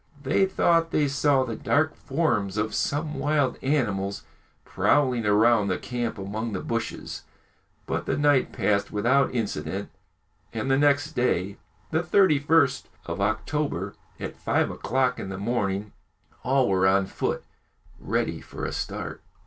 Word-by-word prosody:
They 190 Hz, +8 st, +3 dB
thought 165 Hz, -3 st, +2 dB
they 150 Hz, -2 st, +2 dB
saw 140 Hz, -1 st, +2 dB
the 115 Hz, -3 st, -4 dB
dark 155 Hz, +6 st, +1 dB
forms 120 Hz, -, -1 dB
of 105 Hz, +1 st, -1 dB
some 150 Hz, +1 st, -1 dB
wild 145 Hz, -2 st, +1 dB
animals 105 Hz, -9 st, -1 dB, 0.4 s
prowling 125 Hz, -6 st, +2 dB
round 105 Hz, 0 st, +4 dB
the 90 Hz, -, 0 dB
camp 120 Hz, -3 st, -3 dB
among 105 Hz, +3 st, -4 dB
the 95 Hz, -, -2 dB
bushes, 115 Hz, +3 st, -4 dB, 0.6 s
but -, -, -3 dB
the -, -, 0 dB
night 145 Hz, -2 st, +3 dB
passed 100 Hz, -2 st, 0 dB
without 125 Hz, +7 st, +2 dB
incident, 115 Hz, -4 st, -3 dB, 0.6 s
and 115 Hz, +4 st, -2 dB
the 135 Hz, -, +4 dB
next 145 Hz, +1 st, +3 dB
day, 100 Hz, -, 0 dB, 0.3 s
the 160 Hz, +1 st, +2 dB
31st 160 Hz, -6 st, +3 dB, 0.2 s
of 100 Hz, -, -4 dB
October, 110 Hz, -, -1 dB, 0.3 s
at -, -, -5 dB
five -, -, 0 dB
o'clock 125 Hz, +1 st, 0 dB
in 95 Hz, -, -5 dB
the 95 Hz, -, -5 dB
morning, 100 Hz, -1 st, -1 dB, 0.5 s
all 130 Hz, -1 st, +2 dB
were 95 Hz, -1 st, +3 dB
on 95 Hz, 0 st, +3 dB
foot, 95 Hz, -, -3 dB, 0.6 s
ready -, -, -1 dB
for -, -, -7 dB
a -, -, -3 dB
start. -, -, -5 dB
125 Hz, 140 wpm, -26 LUFS, 100-145 Hz, 0.6 s, round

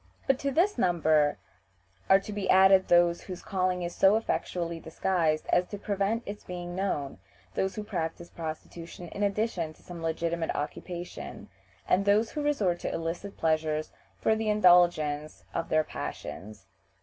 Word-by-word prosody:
But 270 Hz, -1 st, +2 dB
to 280 Hz, -, -1 dB
this 350 Hz, +9 st, +2 dB
number 155 Hz, -4 st, +3 dB, 0.7 s
are 195 Hz, -, +7 dB
to 210 Hz, -, -7 dB
be 200 Hz, -2 st, -3 dB
added 190 Hz, 0 st, +6 dB
those 175 Hz, 0 st, +4 dB
whose 180 Hz, -2 st, -8 dB
calling 185 Hz, -3 st, 0 dB
is 175 Hz, 0 st, -4 dB
so 195 Hz, +2 st, +5 dB
effectually 170 Hz, -6 st, -2 dB
disguised 160 Hz, -1 st, 0 dB
as 180 Hz, 0 st, +3 dB
to 205 Hz, -, -6 dB
prevent 200 Hz, +3 st, -1 dB
its 205 Hz, +1 st, -7 dB
being 175 Hz, -1 st, -6 dB
known 150 Hz, -, -2 dB, 0.3 s
those 190 Hz, 0 st, -1 dB
who 215 Hz, -, -4 dB
practice 170 Hz, -4 st, -4 dB
prostitution 165 Hz, +1 st, -7 dB
in 200 Hz, -, -7 dB
addition 200 Hz, -5 st, 0 dB
to -, -, -24 dB
some 175 Hz, -2 st, -9 dB
legitimate 165 Hz, 0 st, -1 dB
occupation, 175 Hz, +4 st, -6 dB, 0.4 s
and 185 Hz, +2 st, +3 dB
those 210 Hz, +3 st, +3 dB
who 300 Hz, -, -3 dB
resort 210 Hz, -13 st, +1 dB
to -, -, -3 dB
illicit 170 Hz, +4 st, -4 dB
pleasures 155 Hz, -1 st, 0 dB, 0.3 s
for 220 Hz, -, +2 dB
the 220 Hz, 0 st, -1 dB
indulgence 175 Hz, -7 st, +3 dB
of 165 Hz, -, -2 dB
their 155 Hz, 0 st, +3 dB
passions. 105 Hz, -8 st, -7 dB
175 Hz, 155 wpm, -29 LUFS, 165-200 Hz, 0.7 s, are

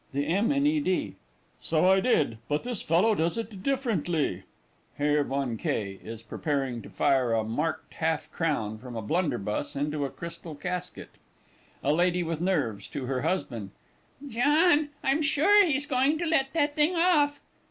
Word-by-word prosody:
THE 140 Hz, +1 st, 0 dB
M. 195 Hz, +9 st, +1 dB
IN 280 Hz, 0 st, +2 dB
E. 305 Hz, +1 st, +3 dB
D. 185 Hz, -11 st, -1 dB, 0.5 s
So 160 Hz, +1 st, +1 dB
I 190 Hz, +1 st, +5 dB
did 150 Hz, -, +1 dB
but 150 Hz, +1 st, 0 dB
this 245 Hz, -4 st, -3 dB
fellow 180 Hz, +7 st, +3 dB
does 170 Hz, +1 st, 0 dB
it 220 Hz, -4 st, -5 dB
differently. 175 Hz, -, -1 dB, 0.5 s
[HERR 145 Hz, 0 st, +2 dB
VON 135 Hz, -4 st, -2 dB
K. 100 Hz, -2 st, -3 dB
is 115 Hz, 0 st, -8 dB
preparing 135 Hz, 0 st, -2 dB
to -, -, -11 dB
fire 130 Hz, -4 st, +2 dB
a 110 Hz, -1 st, +2 dB
marked 150 Hz, +9 st, -3 dB
half 160 Hz, -1 st, -1 dB
crown 110 Hz, -10 st, -1 dB
from 125 Hz, -1 st, -9 dB
a 110 Hz, -, -4 dB
blunderbuss 145 Hz, -, -1 dB
into 145 Hz, +1 st, -1 dB
a 140 Hz, -, -1 dB
crystal 170 Hz, -1 st, -8 dB
casket. 180 Hz, +4 st, -5 dB, 0.7 s
A 145 Hz, -, +2 dB
LADY 175 Hz, +2 st, +2 dB
WITH 165 Hz, -1 st, -3 dB
NERVES 140 Hz, -, -1 dB
(to 135 Hz, -, -5 dB
her 130 Hz, 0 st, -2 dB
husband). 120 Hz, -, -2 dB, 0.6 s
John, 295 Hz, +5 st, +3 dB
I'm 275 Hz, +4 st, +2 dB
sure 315 Hz, +8 st, +5 dB
he's 290 Hz, -2 st, 0 dB
going 275 Hz, +2 st, +2 dB
to 340 Hz, -, -2 dB
let 270 Hz, -5 st, +1 dB
that 290 Hz, -2 st, +1 dB
thing 310 Hz, +4 st, +3 dB
off! 305 Hz, -4 st, +3 dB
165 Hz, 165 wpm, -27 LUFS, -, 0.7 s, I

